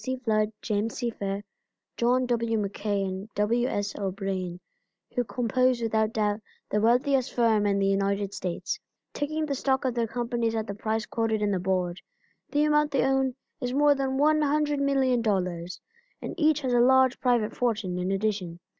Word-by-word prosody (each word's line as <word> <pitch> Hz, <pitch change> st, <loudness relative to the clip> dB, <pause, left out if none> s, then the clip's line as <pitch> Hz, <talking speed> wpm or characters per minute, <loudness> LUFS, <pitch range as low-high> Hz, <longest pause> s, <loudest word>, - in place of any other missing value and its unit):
C. 260 Hz, 0 st, -1 dB
Flood, 215 Hz, -3 st, +1 dB
James 215 Hz, +1 st, -1 dB
C. 240 Hz, -2 st, -2 dB
Fair, 200 Hz, -1 st, -4 dB, 0.5 s
John 250 Hz, +2 st, +2 dB
W. 230 Hz, -2 st, 0 dB
MacKay 200 Hz, 0 st, -1 dB
and 190 Hz, +2 st, -4 dB
W. 235 Hz, +4 st, +1 dB
S. 205 Hz, -5 st, -2 dB
O'Brien, 190 Hz, -2 st, -3 dB, 0.5 s
who 245 Hz, -, +1 dB
compose 245 Hz, +3 st, +1 dB
without 220 Hz, -1 st, +1 dB
doubt 210 Hz, 0 st, 0 dB, 0.3 s
the 210 Hz, -, +2 dB
wealthiest 250 Hz, +3 st, +2 dB
firm 220 Hz, -4 st, +3 dB
in 200 Hz, -1 st, +2 dB
the 195 Hz, -, +1 dB
United 195 Hz, 0 st, 0 dB
States. 180 Hz, -3 st, -3 dB, 0.3 s
Taking 310 Hz, +2 st, -2 dB
the 290 Hz, -, -2 dB
stock 265 Hz, 0 st, 0 dB
of 255 Hz, -, +1 dB
their 235 Hz, -1 st, 0 dB
companies 235 Hz, -1 st, -1 dB
at 220 Hz, -1 st, -1 dB
the 200 Hz, -, -5 dB
price 220 Hz, +1 st, -2 dB
quoted 220 Hz, -2 st, -1 dB
in 205 Hz, -, +1 dB
the 190 Hz, -, 0 dB
board, 180 Hz, -1 st, -1 dB, 0.5 s
the 290 Hz, +1 st, +2 dB
amount 300 Hz, 0 st, +3 dB
they 275 Hz, -2 st, +1 dB
own 265 Hz, -1 st, +1 dB, 0.2 s
is 250 Hz, 0 st, -3 dB
more 290 Hz, 0 st, +5 dB
than 270 Hz, -1 st, -1 dB
$100,000,000, 275 Hz, -, +1 dB, 0.4 s
and -, -, -5 dB
each 310 Hz, -3 st, +2 dB
has 255 Hz, -3 st, -1 dB
a 240 Hz, -, +4 dB
large 260 Hz, +1 st, +5 dB
private 235 Hz, -4 st, +1 dB
fortune 215 Hz, -7 st, -1 dB
in 180 Hz, +1 st, -1 dB
addition. 195 Hz, -4 st, -2 dB
225 Hz, 170 wpm, -27 LUFS, 200-260 Hz, 0.5 s, more